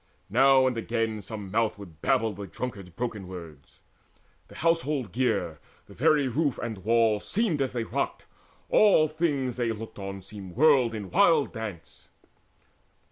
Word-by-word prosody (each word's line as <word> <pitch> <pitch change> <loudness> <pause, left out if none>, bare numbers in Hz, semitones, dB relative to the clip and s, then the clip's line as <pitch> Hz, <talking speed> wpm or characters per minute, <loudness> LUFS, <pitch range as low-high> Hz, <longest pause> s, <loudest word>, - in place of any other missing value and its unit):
Now 135 +3 +5
and 130 -1 +1
again 115 -1 -2
Some 105 -2 -7
mouth 110 0 +1
would 85 -6 -13
babble 120 -5 +1
the 100 +1 -8
drunkard's 100 0 -6
broken 105 0 -5
words. 85 -4 -11 0.7
The - - -15
household 150 - 0
gear, 95 - -1 0.3
the - - -15
very 145 -3 +3
roof 140 +2 0
and 110 -4 -5
walls 110 +1 +2
Seemed 195 -9 0
as 130 -2 -1
they 120 -2 -1
rocked: - - -3 0.4
all 195 -7 +5
things 145 -6 -1
they 120 -2 0
looked 110 -1 -8
on 95 -1 -6
seemed 95 -2 -10
Whirled 130 -4 +4
in 100 -3 -6
wild 165 -7 +4
dance. 110 -7 -8
115 Hz, 150 wpm, -27 LUFS, 100-135 Hz, 0.7 s, Now